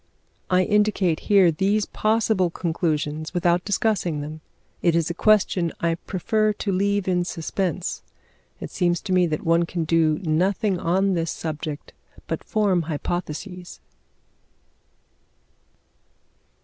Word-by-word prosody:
I 185 0 +4
indicate 205 -5 +2
here 195 -4 +6
these 200 +6 +1
possible 215 -4 +1
conclusions, 155 -2 -2
without 175 0 +2
discussing 200 -6 0
them. 155 +2 -7 0.4
It 170 -2 +3
is 170 0 +1
a - - -3
question 185 -3 +2
I 170 0 +1
prefer 215 +5 0
to 205 0 -3
leave 200 +1 0
in 180 -1 +2
suspense; 175 +1 -3 0.6
it - - -7
seems 175 -2 +1
to 190 - -2
me 180 -1 +4
that 155 -2 -3
one 165 +1 +2
can 170 -1 -2
do 160 -1 +2
nothing 185 +4 +1
on 190 +4 +1
this 165 -2 -1
subject 155 -1 -5 0.3
but - - -4
form 205 -5 +1
hypotheses. 175 +3 -5
175 Hz, 125 wpm, -23 LUFS, 165-195 Hz, 0.6 s, here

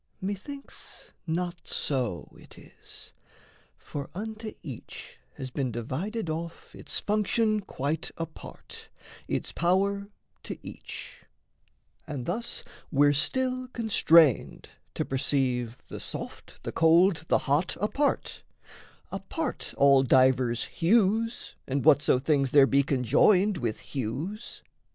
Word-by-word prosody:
Methinks 205 +9 -7 0.2
not 170 0 -3
so 125 -10 -2
it - - -16
is: - - -12 0.7
For 145 -1 -7
unto 220 +2 -5
each 130 -8 -9 0.2
has 130 -1 -6
been 130 -1 -1
divided 160 - -3
off 165 +1 -5
Its - - -4
function 215 +1 +1
quite 155 -5 -3
apart, 165 -1 -9 0.4
its - - -2
power 200 +3 +1 0.3
to - - -6
each; - - -9 0.8
And 140 -5 -5
thus 230 +7 -2 0.3
we're 145 -1 +5
still 255 - 0
constrained 165 - +3 0.3
to - - -1
perceive 130 -3 0
The - - -7
soft, - - -7
the - - -4
cold, 165 +1 +4
the - - +4
hot 150 +5 0
apart, 275 +9 0 0.7
apart 195 +10 -4
All 140 -1 +6
divers 130 -2 +3
hues 220 +5 +1
and 135 +1 -1
whatso 145 -4 +5
things 140 0 +1
there 140 +1 +7
be 140 +1 +3
Conjoined 150 - +3
with 115 -3 -2
hues. 145 - -5
160 Hz, 110 wpm, -28 LUFS, 135-205 Hz, 0.8 s, there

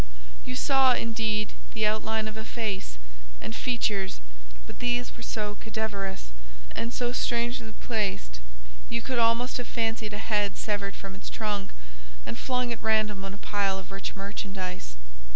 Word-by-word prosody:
You 125 - -2
saw, 265 - +6
indeed, 220 -2 +1 0.2
the 220 -1 +3
outline 220 +1 +2
of 215 - -4
a 220 - -4
face, 205 - -2 0.4
and 110 - -4
features, 210 -6 +1 0.5
but - - -10
these 245 0 +1
were - - -10
so 210 -1 -1
cadaverous 200 - -2 0.4
and 230 +2 -1
so 245 -1 +1
strangely 235 -2 +1
placed, 195 - -1 0.5
you 115 - 0
could 255 -2 +1
almost 230 +2 +4
have 245 - -3
fancied 225 -2 0
a - - -1
head 210 -2 +2
severed 200 -2 0
from 195 -1 -6
its 195 - -6
trunk, 205 -3 -1 0.6
and 115 - -3
flung 250 - +1
at 230 - -7
random 215 -3 +3
on 195 0 -4
a - - -11
pile 200 -2 +4
of 190 0 -7
rich 195 0 -3
merchandise. 195 - -3
215 Hz, 155 wpm, -30 LUFS, 195-230 Hz, 0.6 s, saw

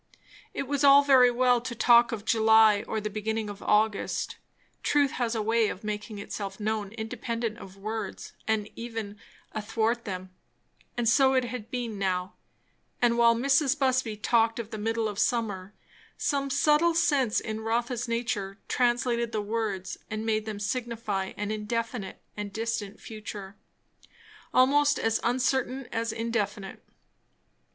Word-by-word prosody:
It - - -3
was 280 +1 -1
all 280 0 +8
very 260 -3 +6
well 245 0 +3
to 240 0 -5
talk 235 +1 +5
of 220 -2 -5
July 220 -2 +5
or 220 - -1
the 215 - -3
beginning 215 0 -2
of 200 - -11
August; 210 0 +1 0.4
truth 285 -2 +2
has 240 -2 -1
a 220 - -1
way 225 0 +2
of 185 - -7
making 210 0 -4
itself 200 -1 -6
known 210 -1 -2
independent 230 0 -4
of 195 0 -11
words 215 +3 -5
and 220 -2 0
even 225 -3 -6 0.3
athwart 225 +2 -1
them; 185 -2 -5 0.7
and 240 -1 0
so 265 +3 +5
it 260 - +3
had 240 -2 -6
been 235 -5 -4
now; 185 -1 -1 0.7
and 240 -1 +3
while 235 0 +5
Mrs. 275 +3 +2
Busby 260 -5 +1
talked 225 +1 +2
of 230 -1 -5
the 220 - -5
middle 225 +1 0
of 205 -1 -5
summer, 210 -5 -1 0.4
some 275 -1 0
subtle 300 +4 +3
sense 285 -9 +2
in 220 0 -5
Rotha's 235 +2 -1
nature 215 -4 -2
translated 240 -1 +1
the 220 - -1
words 205 -3 -3
and 220 0 -4
made 215 -1 0
them 210 -2 -4
signify 215 -3 -3
an 210 +1 -2
indefinite 215 -1 -4
and 210 -1 -5
distant 220 -2 -3
future, 210 -3 -8 1.0
almost 290 +3 +4
as 225 0 +1
uncertain 260 +2 0
as 230 0 -1
indefinite. 220 -3 -3
225 Hz, 145 wpm, -28 LUFS, 210-245 Hz, 1.0 s, all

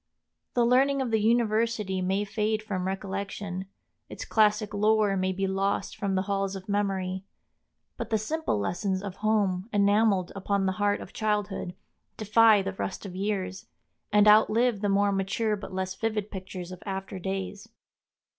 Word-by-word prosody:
The 240 -1 +4
learning 270 +3 +3
of 255 -3 -1
the 220 -1 +2
university 220 -3 +1
may 190 +3 0
fade 215 +1 -1
from 190 -4 -3
recollection, 195 -1 -4 0.4
its - - -7
classic 210 -1 +2
lore 210 -1 +3
may 185 0 0
be 195 +1 -1
lost 195 +1 -1
from 200 -3 -1
the 185 - +1
halls 195 -1 -1
of 190 -1 -8
memory; 195 -2 -1 0.7
but - - -5
the 220 - +2
simple 315 - -1
lessons 185 - -1
of 190 -2 -6
home, 205 -2 0
enameled 200 -2 +3
upon 195 0 0
the 190 - +2
heart 205 0 +2
of - - -10
childhood, 210 -4 -2 0.4
defy 215 -1 +5
the 195 +1 -3
rust 190 +1 -5
of 185 -2 -7
years, 190 -1 -3 0.4
and 210 0 +5
outlive 215 +1 +5
the 205 - +1
more 200 +1 +3
mature 200 +3 0
but 200 - -8
less 185 0 -3
vivid 215 0 -2
pictures 185 -2 -7
of 185 - -9
after 195 -1 -5
days. 195 +3 -4
200 Hz, 160 wpm, -27 LUFS, 190-215 Hz, 0.7 s, defy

